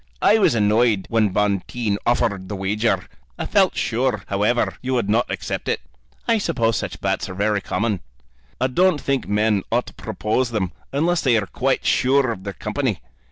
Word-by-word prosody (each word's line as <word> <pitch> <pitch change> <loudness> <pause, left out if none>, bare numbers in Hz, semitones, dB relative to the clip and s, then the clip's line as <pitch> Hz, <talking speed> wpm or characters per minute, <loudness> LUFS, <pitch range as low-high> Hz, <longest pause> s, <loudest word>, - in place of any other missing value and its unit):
"I 220 - +5
was 165 - +4
annoyed 105 -1 +3
when 110 -2 +3
Bonteen 105 +2 0
offered 100 -5 +1
the 105 - -3
wager. 95 -1 0 0.3
I - - -3
felt - - +3
sure, 115 -3 0
however, 105 +5 +1
you 130 0 -1
would 115 -4 0
not 115 +3 +2
accept - - -4
it." - - 0 0.5
"I 230 -1 +3
suppose 115 - +1
such - - -4
bets - - -1
are 90 - -6
very 105 +1 +1
common." 105 +2 -1 0.6
"I - - +2
don't 170 +5 +3
think 135 -3 -1
men 105 0 +2
ought - - +2
to - - -12
propose 115 +4 -1
them 100 -6 -1 0.2
unless 165 +5 +1
they 125 -4 +3
are 105 - 0
quite - - -1
sure 130 -1 +3
of 95 -3 -7
their 100 - -4
company. 105 - -2
110 Hz, 180 wpm, -22 LUFS, 100-130 Hz, 0.6 s, I